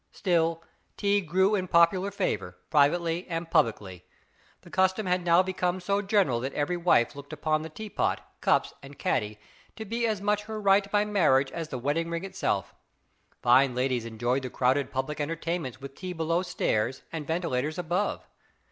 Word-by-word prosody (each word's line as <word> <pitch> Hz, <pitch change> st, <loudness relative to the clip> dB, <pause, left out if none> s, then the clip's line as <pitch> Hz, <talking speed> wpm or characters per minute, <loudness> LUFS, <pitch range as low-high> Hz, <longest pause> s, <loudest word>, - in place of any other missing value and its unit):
Still, 165 Hz, -3 st, 0 dB, 0.3 s
tea 205 Hz, 0 st, +2 dB
grew 190 Hz, +4 st, +2 dB
in 185 Hz, -3 st, 0 dB
popular 170 Hz, +3 st, +4 dB
favor, 95 Hz, -, -3 dB
privately 165 Hz, +4 st, +2 dB
and 165 Hz, -1 st, -4 dB
publicly. 105 Hz, -, 0 dB, 0.6 s
The -, -, -16 dB
custom 190 Hz, +2 st, +2 dB
had 180 Hz, 0 st, 0 dB
now 170 Hz, +1 st, +5 dB
become 185 Hz, -1 st, -1 dB
so 200 Hz, +3 st, 0 dB
general 195 Hz, -, +2 dB
that 130 Hz, +3 st, -4 dB
every 150 Hz, +4 st, 0 dB
wife 170 Hz, -9 st, +2 dB
looked 140 Hz, +1 st, -10 dB
upon 155 Hz, 0 st, 0 dB
the 160 Hz, -, -6 dB
tea 215 Hz, +7 st, -8 dB
pot, 205 Hz, -, -1 dB
cups, -, -, +2 dB
and 140 Hz, 0 st, -12 dB
caddy 105 Hz, 0 st, -1 dB, 0.4 s
to 220 Hz, -, -7 dB
be 230 Hz, +2 st, -1 dB
as 215 Hz, -3 st, -1 dB
much 210 Hz, +1 st, 0 dB
her 220 Hz, 0 st, -5 dB
right 200 Hz, 0 st, +3 dB
by 205 Hz, 0 st, +2 dB
marriage 155 Hz, -10 st, +3 dB
as 165 Hz, -2 st, -4 dB
the 135 Hz, -, -5 dB
wedding 145 Hz, +7 st, -1 dB
ring 170 Hz, +1 st, -3 dB
itself. 190 Hz, -, -2 dB, 0.7 s
Fine 125 Hz, +1 st, +5 dB
ladies 125 Hz, -2 st, 0 dB
enjoyed 120 Hz, +4 st, -1 dB
the 130 Hz, -, -5 dB
crowded 130 Hz, +3 st, +1 dB
public 135 Hz, +3 st, -3 dB
entertainments 165 Hz, -3 st, -3 dB
with 140 Hz, 0 st, -9 dB
tea 185 Hz, +4 st, -6 dB
below 165 Hz, +1 st, 0 dB
stairs 130 Hz, -9 st, -1 dB
and 155 Hz, -3 st, -5 dB
ventilators 155 Hz, -3 st, -1 dB
above. 180 Hz, +4 st, -1 dB
165 Hz, 175 wpm, -27 LUFS, 135-190 Hz, 0.7 s, now